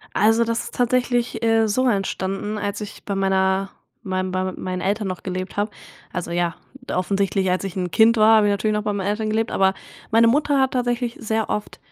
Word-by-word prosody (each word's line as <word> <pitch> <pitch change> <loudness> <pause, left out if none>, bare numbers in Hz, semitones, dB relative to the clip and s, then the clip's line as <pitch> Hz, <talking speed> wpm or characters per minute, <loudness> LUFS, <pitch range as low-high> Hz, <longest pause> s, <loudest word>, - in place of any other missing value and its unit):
Also, 225 +3 +4
das 230 0 -2
ist - - -9
tatsächlich, 245 -1 0
äh, 225 -1 +3
so 255 +5 +2
entstanden, 195 0 -2
als 205 0 -3
ich 210 - -8
bei 200 - -3
meiner 190 0 +1 0.3
meinem 185 -1 -2
bei 185 0 -1
mit 185 - -4
meinen 185 0 -4
Eltern 205 +2 -1
noch 185 -1 -5
gelebt 185 0 -5
habe. 205 +1 0 0.4
Also, 180 -2 -4
ja, 175 0 -1 0.3
offensichtlich 195 0 0
als 185 +2 0
ich 195 0 -5
'n 180 -1 -2
Kind 225 +4 +5
war, 220 +1 +6
habe 210 - +3
ich - - +3
natürlich 210 +2 0
noch 210 - -1
bei 210 - 0
meinen 200 -1 -3
Eltern 215 +1 -1
gelebt, 220 +1 0
aber 190 0 +2 0.4
meine 230 +1 +5
Mutter 290 +3 +2
hat 265 -1 +3
tatsächlich 245 -1 -1
sehr 220 0 -2
oft, 210 - -3
205 Hz, 210 wpm, -22 LUFS, 190-225 Hz, 0.4 s, war